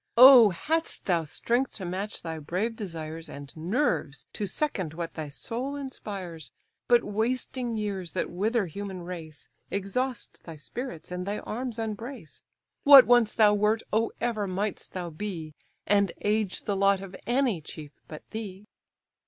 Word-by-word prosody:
"Oh! 250 -3 +10
hadst 320 - -1
thou 170 -4 +1
strength 240 - 0
to 190 - -6
match 190 +4 -4
thy 160 -1 -4
brave 185 +10 -2
desires, 165 -5 -6
And 140 0 -9
nerves 165 - -1
to 205 - -3
second 190 - -2
what 170 -1 -4
thy 155 -2 -5
soul 245 - -4
inspires! 195 - -6 0.4
But 240 -1 +5
wasting 235 +2 -1
years, 195 -6 -3
that - - -2
wither 210 +5 +1
human 190 +1 -6
race, 165 -4 -8 0.2
Exhaust 230 +6 -3
thy 165 - -9
spirits, 175 - -7
and 180 +1 -4
thy 205 +1 -1
arms 240 +2 -4
unbrace. 225 - -6 0.4
What 280 -4 +11
once 240 -1 +4
thou 210 -2 +6
wert, 210 +2 +2
oh 225 +1 +2
ever 225 -4 -1
mightst 195 +2 -3
thou 175 -2 -4
be! 165 -3 -5 0.3
And 200 -2 +3
age 210 -2 0
the 200 - -1
lot 195 0 +3
of 195 -1 -8
any 240 -7 +2
chief 150 -1 -9 0.2
but 155 - -9
thee." 210 -3 -6
205 Hz, 155 wpm, -28 LUFS, 175-230 Hz, 0.4 s, What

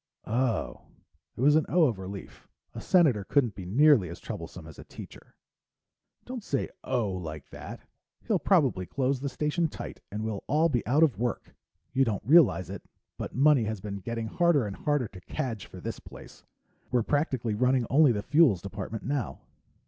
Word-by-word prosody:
"Oh." 120 +1 -1 0.5
It - - -5
was 145 +3 +5
an 155 - +2
"oh" 175 +2 +4
of 120 -10 +1
relief. 95 +1 -9 0.3
A - - -7
senator 150 - +3
couldn't 125 0 +1
be 95 -2 -8
nearly 125 - +5
as 85 - -8
troublesome - - -8
as - - -12
a - - -9
teacher. - - -12 0.9
"Don't 250 -3 -6
say - - -2
'oh' 115 -6 -1
like 80 -5 -7
that. - - -9 0.4
He'll - - +1
probably 95 -1 +2
close 135 0 0
the 140 +1 -3
Station 150 +5 0
tight - - -8
and 105 +2 -4
we'll 110 -3 -4
all 155 +4 +3
be 120 -7 0
out 145 +7 +4
of 135 -11 +2
work. 120 0 -3 0.4
You 135 0 +4
don't 110 -5 -2
realize, 120 - +5
it, 95 0 -7 0.4
but - - -5
money 135 -2 +4
has 110 -1 -3
been 100 +1 -5
getting 115 +3 -4
harder 165 +1 +2
and 100 -2 -5
harder 145 -5 0
to 95 -2 -13
cadge 115 +1 -4
for - - -11
this - - -5
place. - - -13 0.5
We're 125 -2 +1
practically 130 -5 0
running 125 +3 +2
only 145 0 +6
the 105 -3 -2
Fuels 140 - +4
department 100 +2 -6
now." 140 -4 -3
120 Hz, 180 wpm, -28 LUFS, 100-145 Hz, 0.9 s, only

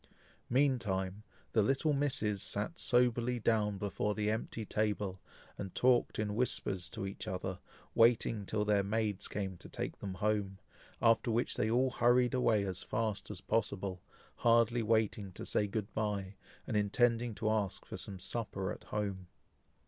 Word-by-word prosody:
Meantime, 105 -8 +1 0.3
the 110 - +4
little 135 +8 +2
misses 120 -8 0
sat 105 +14 -2
soberly 125 -2 +2
down 105 -2 +1
before 105 +1 -1
the 105 0 +1
empty 110 0 -3
table, 105 -3 -1 0.4
and 95 -2 -6
talked 125 -1 +3
in 105 -1 -1
whispers 105 -5 -1
to - - -5
each 95 - -6
other, 95 0 -3 0.3
waiting 115 -2 +4
till 105 +1 -1
their 105 -1 +3
maids 105 0 -1
came 95 -2 -3
to - - -12
take - - -5
them 95 -2 -5
home, 100 0 0 0.5
after 115 0 +4
which 115 +2 +1
they 110 - +1
all 125 +3 +3
hurried 125 +2 +3
away 115 -5 +3
as 95 -2 -2
fast 110 -2 -2
as - - -6
possible, 100 -4 -1 0.4
hardly 115 0 +4
waiting 110 -2 +1
to - - -8
say 105 - +1
"good 105 +1 -4
bye," 100 -3 -2 0.3
and 115 - -3
intending 115 +2 +2
to 110 +2 -2
ask 105 -3 -1
for - - -7
some 100 - -6
supper 95 -2 -1
at - - -8
home. 100 -3 -3
105 Hz, 155 wpm, -34 LUFS, 100-115 Hz, 0.5 s, the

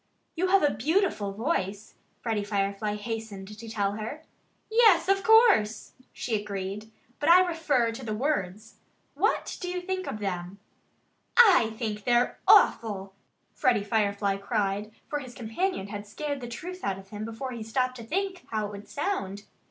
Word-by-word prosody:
"You 360 +2 +1
have 385 -1 +4
a 290 - +3
beautiful 265 - 0
voice," 205 - -2 0.3
Freddie 220 -3 -1
Firefly 200 +1 -1
hastened 210 -2 -6
to 230 0 -8
tell 205 -3 0
her. 220 +9 -6 0.4
"Yes 440 -7 +5
of 390 0 +2
course!" 445 - +4 0.2
she 235 - -3
agreed. 200 +1 -5 0.3
"But 295 - +1
I 365 +2 +8
refer 305 -9 +1
to 225 +4 -8
the 215 -2 -3
words. 215 -6 -2 0.4
What - - 0
do 360 - -3
you 360 0 -2
think 370 +1 -3
of - - -3
them?" 185 -2 -4 0.8
"I 355 - +6
think 215 -3 -3
they're 245 0 +2
awful!" 195 -4 +4 0.4
Freddie 235 -5 +2
Firefly 200 -2 0
cried; 205 0 -1 0.2
for 295 - -2
his 255 -3 -10
companion 230 - -2
had 205 0 -6
scared 285 +5 -4
the 240 - -5
truth 355 +10 -7
out 195 -1 -1
of 195 0 -13
him 210 +1 -6
before 230 +4 -5
he 235 -2 -6
stopped 255 +3 -1
to 230 - -8
think 375 - -2
how 215 -1 -1
it 205 - -6
would 205 0 -10
sound. 205 - -3
225 Hz, 165 wpm, -27 LUFS, 205-305 Hz, 0.8 s, I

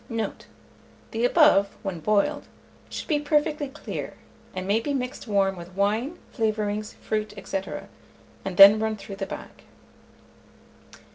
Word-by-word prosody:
Note. 230 -2 -4 0.6
The 230 +2 0
above, 245 - +4
when 190 -4 -3
boiled, 215 - +1 0.4
should - - -6
be 300 -4 +2
perfectly 295 0 +1
clear, 265 - -6 0.4
and 185 0 -3
may 205 +3 +3
be 285 +4 -2
mixed 250 -1 -4
warm 195 -2 +2
with 175 +1 -11
wine, 220 - 0 0.2
flavourings, 215 -2 -1
fruits, 215 0 -3
&c., 195 - -1 0.8
and 190 -2 -5
then 200 +2 +10
run 220 0 0
through 200 -1 -9
the 195 -1 -3
bag. - - -9
215 Hz, 135 wpm, -25 LUFS, 200-260 Hz, 0.8 s, then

